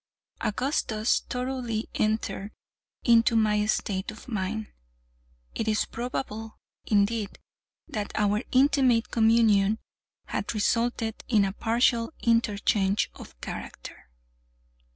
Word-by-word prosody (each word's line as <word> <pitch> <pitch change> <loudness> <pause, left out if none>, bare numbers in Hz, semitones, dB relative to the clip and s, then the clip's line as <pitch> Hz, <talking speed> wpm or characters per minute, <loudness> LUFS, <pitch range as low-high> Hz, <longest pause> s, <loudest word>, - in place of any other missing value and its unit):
Augustus 220 -2 0
thoroughly 250 -3 -2
entered 215 -2 -1 0.5
into 230 -1 +5
my 210 -1 +3
state 195 -2 -1
of 215 +4 -10
mind. 215 -1 -2 0.9
It 225 - -3
is 215 0 +2
probable, 225 -2 -5 0.3
indeed, 210 0 +1 0.5
that 210 -2 -4
our 210 0 +2
intimate 260 -3 +3
communion 220 -2 +4 0.5
had - - -3
resulted 230 +1 0
in 210 -4 +4
a 195 - -2
partial 230 +4 +1
interchange 210 -3 +2
of - - -13
character. - - -8
220 Hz, 95 wpm, -27 LUFS, 210-235 Hz, 0.9 s, into